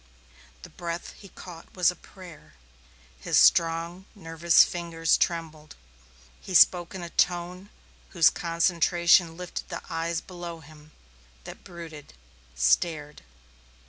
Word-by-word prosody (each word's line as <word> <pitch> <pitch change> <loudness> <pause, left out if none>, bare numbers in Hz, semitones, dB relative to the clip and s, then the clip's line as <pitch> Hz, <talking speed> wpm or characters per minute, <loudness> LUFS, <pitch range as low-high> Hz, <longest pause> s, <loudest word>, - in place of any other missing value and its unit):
The - - -12
breath 170 -1 -6
he 200 - -14
caught 175 -3 -13
was 180 -1 +3
a - - -13
prayer; 170 - -15 0.7
his - - 0
strong, 170 +2 +3
nervous 165 -2 +3
fingers 165 -2 -1
trembled. 160 -3 -3 0.7
He 185 - -6
spoke 175 +1 +4
in 185 - -6
a 170 - -8
tone 180 +2 -1 0.4
whose 170 -5 +4
concentration 170 0 +2
lifted 180 -1 -7
the - - -6
eyes 165 0 -2
below 175 -2 -9
him, 155 0 -17 0.5
that - - -11
brooded, 165 - -11 0.4
stared. 145 - 0
170 Hz, 115 wpm, -26 LUFS, 165-175 Hz, 0.7 s, spoke